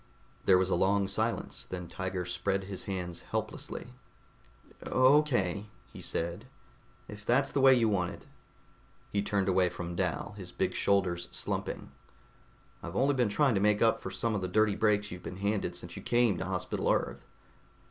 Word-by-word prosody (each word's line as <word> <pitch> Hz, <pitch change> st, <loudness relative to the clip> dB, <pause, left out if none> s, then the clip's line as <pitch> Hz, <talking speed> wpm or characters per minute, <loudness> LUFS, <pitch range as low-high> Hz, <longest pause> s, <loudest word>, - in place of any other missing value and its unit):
There 95 Hz, -, +6 dB
was 95 Hz, +1 st, +1 dB
a -, -, +4 dB
long 100 Hz, +2 st, +2 dB
silence. 110 Hz, +4 st, -2 dB
Then 90 Hz, -2 st, -5 dB
Tiger 95 Hz, 0 st, -3 dB
spread 95 Hz, +2 st, -1 dB
his 95 Hz, -1 st, -6 dB
hands 90 Hz, -3 st, -4 dB
helplessly. 125 Hz, -, -5 dB, 0.9 s
"Okay," 130 Hz, -, +3 dB, 0.3 s
he -, -, -9 dB
said, 85 Hz, +1 st, -2 dB, 0.6 s
"if 105 Hz, 0 st, -10 dB
that's 130 Hz, +5 st, +2 dB
the 140 Hz, -, +1 dB
way 135 Hz, -1 st, +8 dB
you 115 Hz, -2 st, +3 dB
want 90 Hz, -4 st, +1 dB
it." -, -, -10 dB, 0.9 s
He 100 Hz, -, +1 dB
turned 100 Hz, -1 st, 0 dB
away 95 Hz, -1 st, +3 dB
from 85 Hz, -1 st, -6 dB
Dal, 90 Hz, +1 st, -1 dB
his 90 Hz, -3 st, -7 dB
big -, -, -1 dB
shoulders 90 Hz, -3 st, +1 dB
slumping. -, -, -4 dB, 0.9 s
"I've 85 Hz, +1 st, -7 dB
only 140 Hz, +6 st, +3 dB
been 125 Hz, -5 st, +2 dB
trying 135 Hz, +5 st, +3 dB
to 95 Hz, -, +1 dB
make 105 Hz, +1 st, +3 dB
up 115 Hz, -, +3 dB
for -, -, -5 dB
some 110 Hz, +4 st, -1 dB
of 100 Hz, -, -1 dB
the 95 Hz, -, -1 dB
dirty 105 Hz, +2 st, +3 dB
breaks 105 Hz, -1 st, +2 dB
you've 90 Hz, 0 st, -7 dB
been 90 Hz, -, -7 dB
handed 100 Hz, +1 st, -1 dB
since -, -, -8 dB
you -, -, -7 dB
came 120 Hz, -7 st, +2 dB
to -, -, -2 dB
Hospital 90 Hz, -1 st, -1 dB
Earth." -, -, -1 dB
100 Hz, 175 wpm, -31 LUFS, 90-110 Hz, 0.9 s, way